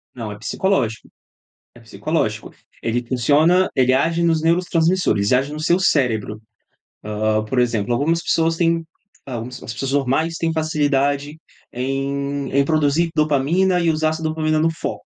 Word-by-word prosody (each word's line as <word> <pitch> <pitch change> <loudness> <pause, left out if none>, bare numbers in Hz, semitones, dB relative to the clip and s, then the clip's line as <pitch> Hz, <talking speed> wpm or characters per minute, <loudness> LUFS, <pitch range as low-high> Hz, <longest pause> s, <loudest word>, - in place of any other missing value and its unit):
Não, 115 -4 -6
é 105 - -8
psicológico, 115 - -1 0.7
é - - -14
psicológico. 115 0 -3 0.3
Ele 120 +1 -2
funciona 150 +9 +3
ele 130 -1 +3
age 165 +6 +1
nos 165 -2 +2
neurotransmissores, 165 - +1
ele 125 - +5
age 140 +3 -5
no 155 - -6
seu 170 +3 +2
cérebro. 115 - 0 0.6
Hã, 110 0 0
por 125 +4 -3
exemplo, 115 -3 +1
algumas 160 +7 +1
pessoas 165 -1 +1
têm, 165 -1 +1 0.4
hã, 125 -4 -4
umas 125 +2 -7
ps - - -13
as - - -5
pessoas 135 +4 -4
normais 145 +4 0
têm 165 0 -1
facilidade 145 -2 0 0.3
em 140 +2 -3
em 140 +1 +3
produzir 155 +2 +1
dopamina 155 +5 +2
e 170 -1 +2
usar 155 0 +1
essa 160 +1 -5
dopamina 155 0 0
no 160 +1 +2
foco. 160 - -5
145 Hz, 160 wpm, -20 LUFS, 125-165 Hz, 0.7 s, ele